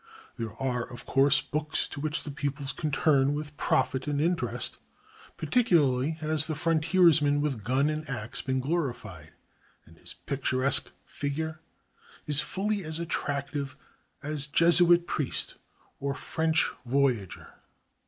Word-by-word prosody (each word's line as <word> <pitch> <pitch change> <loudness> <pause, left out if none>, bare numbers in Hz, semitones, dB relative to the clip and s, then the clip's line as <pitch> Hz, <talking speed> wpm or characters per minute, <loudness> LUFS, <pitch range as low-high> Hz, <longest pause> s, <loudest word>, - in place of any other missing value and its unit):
There 115 -2 -6
are, 125 -2 -1
of 120 - -9
course, 135 0 +3
books 150 +2 -2
to - - -7
which 155 0 -2
the 150 - -6
pupils 140 -1 -3
can 155 - -3
turn 140 -1 +2
with 150 0 -6
profit 130 -1 0
and 145 -1 -1
interest. 170 +3 -1 0.6
Particularly 155 - +2
has 155 -1 0
the 155 - -2
frontiersman 160 -2 +3
with 140 -7 -2
gun 130 +6 +1
and 155 0 -3
axe 120 -4 -4
been 130 0 -1
glorified, 120 - -4 0.5
and - - -19
his - - -9
picturesque 130 0 +3 0.2
figure 155 +2 -4 0.7
is 150 -1 +2
fully 200 +5 -2
as 155 -1 -4
attractive 140 -4 -3 0.5
as 150 -1 -3
Jesuit 170 +3 +5
priest 150 -5 -3 0.4
or 140 0 -2
French 160 +2 +1 0.2
voyageur. 125 -6 -1
145 Hz, 130 wpm, -28 LUFS, 135-160 Hz, 0.7 s, Jesuit